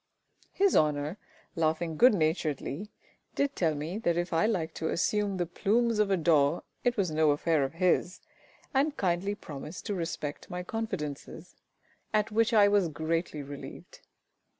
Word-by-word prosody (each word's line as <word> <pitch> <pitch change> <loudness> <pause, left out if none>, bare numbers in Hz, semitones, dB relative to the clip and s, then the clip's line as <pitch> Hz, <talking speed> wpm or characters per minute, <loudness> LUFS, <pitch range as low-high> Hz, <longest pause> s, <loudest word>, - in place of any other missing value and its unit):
His 395 0 +2
Honour, 150 +4 +1 0.4
laughing 160 0 0
good 245 +7 +6
naturedly, 155 +2 -1 0.5
did 280 0 0
tell 160 -4 +1
me 160 +8 -4
that 170 -6 0
if 175 0 -2
I 165 +5 +3
liked 180 -8 -1
to 160 - -2
assume 200 +2 0
the 175 - 0
plumes 220 +6 +1
of 210 -1 +3
a 195 - +3
daw, 155 -2 +3 0.2
it 245 -1 +1
was 190 -5 +1
no 155 0 +3
affair 150 +1 +2
of 135 - -3
his, 180 +1 +1 0.5
and 285 +2 +1
kindly 190 +2 0
promised 150 -1 -8
to 210 - -2
respect 165 -5 -4
my 180 0 -4
confidences 175 -6 -5 0.6
at 215 +1 +1
which 225 +2 +2
I 210 -3 +6
was 200 -3 +3
greatly 160 0 -2
relieved. 140 0 -10
175 Hz, 155 wpm, -29 LUFS, 155-205 Hz, 0.6 s, good